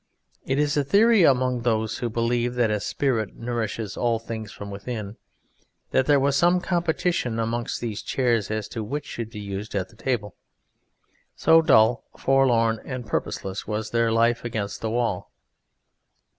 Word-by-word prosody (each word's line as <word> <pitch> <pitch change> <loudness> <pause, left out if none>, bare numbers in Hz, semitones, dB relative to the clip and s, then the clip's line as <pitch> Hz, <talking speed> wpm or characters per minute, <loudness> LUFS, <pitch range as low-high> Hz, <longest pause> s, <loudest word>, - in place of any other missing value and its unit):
It 135 - +1
is 145 -1 +1
a 145 - +3
theory 210 - +5
among 130 -5 +3
those 110 -2 0
who 120 - -2
believe 120 +2 0
that 120 -3 +2
a 105 - 0
spirit 115 -2 -1
nourishes 115 -3 -3
all 120 -1 +1
things 110 -1 -6
from 100 0 -8
within, 105 +1 -6 0.7
that 130 - +2
there 145 -2 +5
was 140 +1 +2
some 175 +5 +4
competition 170 -8 0
amongst 115 +1 -2
these 115 -2 -3
chairs 120 -5 0
as 110 -1 -2
to 110 -1 -4
which 145 +8 -4
should 115 -2 -5
be 105 - -8
used 100 +1 -6
at 100 +3 -3
table, 115 -5 -2 1.0
so 165 +1 +5
dull, 115 -6 +4
forlorn 120 -5 +3
and 125 -2 -6
purposeless 95 -2 -3
was 110 0 -3
their 115 -1 +2
life 115 +1 +2
against 110 -4 -4
the 110 - -2
wall. 115 -5 -1
115 Hz, 155 wpm, -24 LUFS, 110-130 Hz, 1.0 s, theory